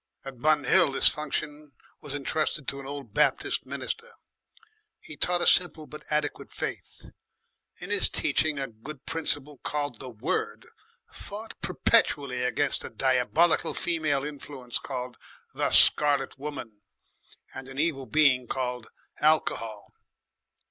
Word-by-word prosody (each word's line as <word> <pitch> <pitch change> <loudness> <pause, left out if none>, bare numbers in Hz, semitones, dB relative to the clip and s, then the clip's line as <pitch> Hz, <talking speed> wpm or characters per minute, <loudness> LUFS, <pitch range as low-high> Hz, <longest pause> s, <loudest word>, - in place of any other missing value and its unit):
At 130 -3 -9
Bun 155 -1 +3
Hill 140 - +5
this - - +4
function 150 -1 -5 0.3
was 145 -1 -7
entrusted 150 +1 -2
to 140 - -3
an 135 - -9
old 140 -6 -8
Baptist - - +1
minister. 475 +1 -5 0.9
He - - -11
taught 175 -1 +1
a - - +1
simple 160 -3 +3
but 150 0 -11
adequate 150 -1 -2
faith. - - -7 0.7
In - - -8
his - - +3
teaching 155 -2 +1
a 135 - -1
good 135 +4 -11
principle 145 -3 -1
called 145 -2 -3
the 130 - -7
Word 110 -3 -3 0.5
fought 215 +2 -8
perpetually 140 - +2
against 135 +3 0
a - - -6
diabolical 135 +6 +2
female 155 -5 0
influence 140 -4 -5
called 125 -2 -6 0.4
the - - 0
Scarlet 145 -2 +6
Woman 135 -7 -8 0.7
and 130 0 -8
an 135 - -10
evil 145 -4 -1
being 135 -5 +3
called 125 -2 -3 0.3
Alcohol. 115 -8 0
145 Hz, 130 wpm, -27 LUFS, 130-155 Hz, 0.9 s, Scarlet